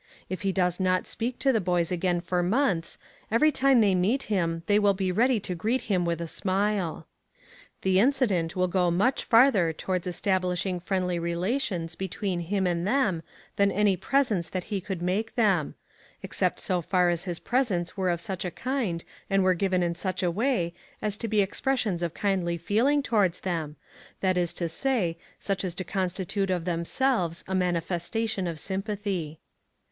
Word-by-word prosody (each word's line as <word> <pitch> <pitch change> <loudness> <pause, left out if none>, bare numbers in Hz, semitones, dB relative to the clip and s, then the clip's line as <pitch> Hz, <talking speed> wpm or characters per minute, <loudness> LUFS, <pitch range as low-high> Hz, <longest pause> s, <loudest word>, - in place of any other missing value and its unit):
If 185 - -4
he 195 -1 +1
does 180 -1 +1
not 185 -1 +1
speak 240 +2 -3
to 270 -1 +2
the 220 - +2
boys 175 -1 0
again 175 0 0
for 180 0 0
months, 185 -3 +1 0.3
every 305 +8 +4
time 270 -3 +4
they 200 -3 +4
meet 200 +9 +1
him 165 -3 0
they 205 +2 +4
will 200 -1 +3
be 190 -1 -1
ready 235 +5 +3
to 185 - -3
greet 220 +9 0
him 185 -4 0
with 170 -1 -1
a 170 - -4
smile. 190 -1 -1 0.8
The 190 0 +3
incident 205 - +2
will 185 0 +2
go 180 -1 +2
much 200 +10 +1
farther 225 -8 +5
towards 180 +3 -3
establishing 180 0 0
friendly 180 -1 -1
relations 170 0 -1
between 190 +1 -3
him 190 +3 -1
and 175 0 0
them 210 -9 +1 0.4
than 200 0 +4
any 205 0 +3
presents 215 -3 +1
that 185 -1 -3
he 195 - -1
could 190 -3 -5
make 205 +6 -1
them 195 - +2 0.5
except - - -1
so 180 -1 0
far 180 +1 +2
as 170 +1 -2
his 175 -3 -3
presents 215 -9 0
were 190 -2 0
of 170 -1 0
such 190 -1 -4
a 180 - -2
kind, 230 -7 -2 0.3
and 195 -1 +3
were 185 0 +4
given 185 0 +1
in 170 0 0
such 185 +2 -3
a 175 - +2
way, 195 -4 0 0.3
as 210 -1 -2
to 230 - -3
be 215 -1 +3
expressions 205 -2 -1
of 170 -2 -2
kindly 185 -4 0
feeling 240 - +2
towards 200 -9 +1
them 165 -5 -3 0.4
that 185 -1 +1
is 175 -2 +1
to 170 - -2
say, 175 -2 0 0.2
such 195 -1 -2
as 180 -2 -3
to 185 - -3
constitute 190 +1 -2
of 180 -3 -1
themselves 175 +1 0
a 190 - -3
manifestation 180 +3 -1
of 165 -2 -4
sympathy. 195 -5 -3
185 Hz, 180 wpm, -27 LUFS, 175-210 Hz, 0.8 s, farther